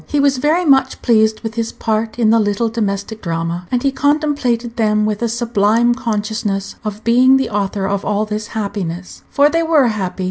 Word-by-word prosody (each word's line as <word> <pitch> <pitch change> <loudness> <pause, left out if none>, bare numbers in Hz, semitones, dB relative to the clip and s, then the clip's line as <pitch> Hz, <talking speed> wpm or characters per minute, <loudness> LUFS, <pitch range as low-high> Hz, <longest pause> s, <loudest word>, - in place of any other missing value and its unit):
He 295 - 0
was 280 -2 +2
very 320 +6 +1
much 270 -3 +2
pleased 220 -2 +2
with 225 -1 -5
his 230 0 -3
part 220 0 -2
in 225 -3 +3
the 230 - +4
little 210 +2 0
domestic 215 -1 -3
drama, 170 +1 -3
and 245 -1 -1
he 275 - +2
contemplated 275 -5 0
them 215 -2 +1
with 215 0 -2
a 235 - 0
sublime 235 0 +2
consciousness 215 -4 -3
of 215 0 -6
being 255 +3 +5
the 265 - -2
author 200 -1 -2
of 200 0 -2
all 210 +1 0
this 210 0 -4
happiness; 185 -4 -5
for 285 +1 +4
they 330 +3 +1
were 315 -6 +3
happy. 190 -4 -4
220 Hz, 190 wpm, -17 LUFS, 205-250 Hz, -, being